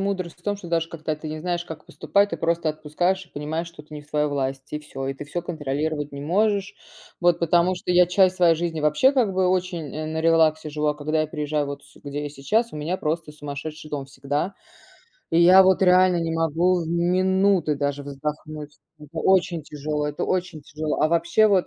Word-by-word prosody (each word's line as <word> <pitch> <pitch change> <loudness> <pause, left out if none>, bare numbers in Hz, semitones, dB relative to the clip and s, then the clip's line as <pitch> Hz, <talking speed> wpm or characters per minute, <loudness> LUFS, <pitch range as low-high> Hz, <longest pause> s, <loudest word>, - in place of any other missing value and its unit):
мудрость 190 -4 -2
в 175 - -25
том, 205 -1 -1
что 180 -4 -10
даже 165 -1 0
когда 155 -2 -4
ты 155 0 -7
не 155 0 -5
знаешь, 175 0 -2
как 160 -3 -9
поступать, 200 0 +1
ты - - -3
просто 165 -1 0
отпускаешь 165 +5 -1
и - - -26
понимаешь, 155 +3 -3
что 165 -3 -12
это 155 - -18
не 150 - -6
в 145 - -20
твоей 150 0 +1
власти, 135 0 -3
и - - -3
всё, 135 -3 -6
и 135 - -2
ты 145 - -8
всё 170 +4 -4
контролировать 150 -2 -3
не 140 - -6
можешь. 200 +5 +1 0.5
Вот, 175 -1 +3
потому 170 +2 +3
что 180 - -5
я 180 0 +6
часть 185 +1 +3
своей 170 -2 +5
жизни 165 -1 -2
вообще 150 - +4
как 235 -8 +2
бы 185 -1 +2
очень, 180 -5 -1
э, 155 0 -4
на 160 0 -3
релаксе 160 -2 +3
живу, 150 0 -2
а 150 - +2
когда 155 +1 0
я - - -2
приезжаю, 150 -1 -2
вот 140 0 -6
сю - - -19
где 145 +1 -4
я 145 - -3
сейчас, 215 - 0
у - - -6
меня 160 +5 -2
просто 155 -1 -3
сумасшедший 150 +1 -7
дом 140 -2 -3
всегда. 145 +7 -3 0.8
И 165 - +3
я 185 +2 +8
вот 190 0 +4
реально 185 -1 +5
не 165 -1 -2
могу 165 +2 +1
минуты 180 0 +2
даже 140 0 -2
вздохнуть. 150 +1 -6 0.2
Это 150 +2 -10
очень 175 -3 +2
тяжело, 150 0 -3
это 150 - -3
очень 180 -5 -2
тяжело. 150 +1 -3
А 155 - +4
вообще, 170 +6 +3
вот, 195 -3 +3
160 Hz, 215 wpm, -24 LUFS, 150-180 Hz, 0.8 s, я